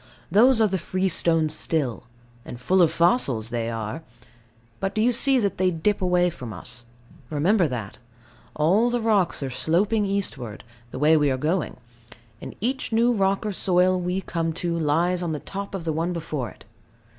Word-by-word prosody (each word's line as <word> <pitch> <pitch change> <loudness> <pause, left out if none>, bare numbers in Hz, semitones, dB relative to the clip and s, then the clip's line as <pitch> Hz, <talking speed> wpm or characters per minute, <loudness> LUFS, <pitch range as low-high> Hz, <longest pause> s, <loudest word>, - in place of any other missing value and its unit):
Those 235 +6 +5
are 220 - +4
the 190 -2 -2
freestone 170 -3 +1
still: 150 -6 -1 0.4
and 120 - -9
full 185 +9 +2
of 165 - +4
fossils 140 - +1
they 115 -1 -2
are. 115 +6 -4 0.8
But 195 0 -3
do 215 - +1
you 245 - +4
see 265 +3 +4
that 205 -7 -1
they 185 0 +3
dip 180 +5 -1
away 180 -1 +2
from 120 -7 -8
us? 120 +6 -6 0.4
Remember 175 +5 +2
that. 115 -6 -6 0.6
All 190 +11 +3
the 245 0 0
rocks 210 -9 +1
are 135 - -4
sloping 200 - +1
eastward, 145 - -3 0.3
the - - -8
way 155 +3 +4
we 145 -2 +2
are 130 - 0
going; 160 +5 -1 0.6
and - - -8
each 255 +4 -2
new 235 +2 +3
rock 195 -1 0
or 210 - -2
soil 185 0 +2
we 180 +2 -2
come 165 -2 -2
to 170 0 -2
lies 170 +3 +1
on 170 -2 -2
the 150 - -3
top 200 +4 -6
of 185 - -5
the 160 - -1
one 165 +3 -1
before 155 -7 -4
it. - - -17
175 Hz, 180 wpm, -24 LUFS, 150-195 Hz, 0.8 s, Those